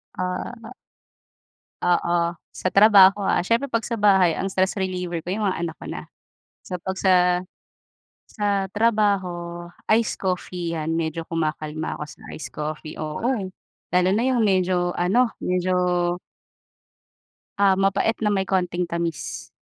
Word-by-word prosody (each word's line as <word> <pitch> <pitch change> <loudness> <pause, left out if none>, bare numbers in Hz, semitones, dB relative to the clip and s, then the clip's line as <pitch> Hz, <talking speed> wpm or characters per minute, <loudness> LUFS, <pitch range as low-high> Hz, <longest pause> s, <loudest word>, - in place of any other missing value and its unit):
Ah. 185 +6 -4 1.1
Oo, 175 -1 +2 0.2
sa 185 - -3
trabaho, 200 -1 +7
ah, 195 - +2
siyempre 235 +6 +1
pag 230 -1 -1
sa - - -4
bahay 190 -5 +5
ang 195 - -2
stress 190 0 +1
reliever 180 -3 -3
ko 170 - -8
yung 210 +3 -1
mga 185 -3 -1
anak 165 -1 -3
ko - - -11
na. - - -6 0.6
So 180 - -5
pag 190 +2 -4
sa 190 - +4 1.1
sa 200 -2 -1
trabaho, 190 -6 0 0.2
iced 225 +1 +2
coffee, 180 -2 -3
yan 160 -1 -2
medyo 165 0 -2
kumakalma 155 -1 -2
ako - - -7
sa - - -14 0.2
iced 155 - -7
coffee, 155 0 -6
oo, 155 +3 -4 0.7
lalo 180 0 +4
na 215 +4 +2
yung 250 -3 +2
medyo 185 -3 +2
ano, 225 +8 +3
medyo 180 0 0 1.8
ah, 200 -1 +5
mapait 195 +3 +2
na 210 - +2
may 195 -2 +1
konting 180 -2 0
tamis. 170 -4 -4
185 Hz, 140 wpm, -23 LUFS, 170-200 Hz, 1.8 s, trabaho